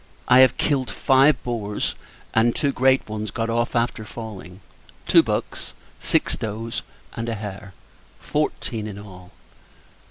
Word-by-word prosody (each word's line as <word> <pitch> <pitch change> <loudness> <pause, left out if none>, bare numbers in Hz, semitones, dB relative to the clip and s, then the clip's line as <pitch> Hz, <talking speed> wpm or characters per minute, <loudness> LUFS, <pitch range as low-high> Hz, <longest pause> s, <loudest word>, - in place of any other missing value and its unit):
I 125 +1 +7
have 130 0 +6
killed 135 -4 +1
five 135 +2 +4
boars, 105 -4 -2 0.4
and 115 +1 +3
two 140 -2 +1
great 130 0 +3
ones 110 0 -4
got 115 +3 -2
off 120 +1 0
after 115 -1 0
falling; 105 -4 -9 0.5
two - - +7
bucks; - - -3 0.3
six - - +1
does; 110 +2 -4 0.3
and 115 +1 -4
a 115 - -1
hare: 100 -2 -8 0.4
fourteen 110 -2 -2
in 100 -2 -7
all. 90 -3 -12
115 Hz, 135 wpm, -23 LUFS, 105-120 Hz, 0.5 s, I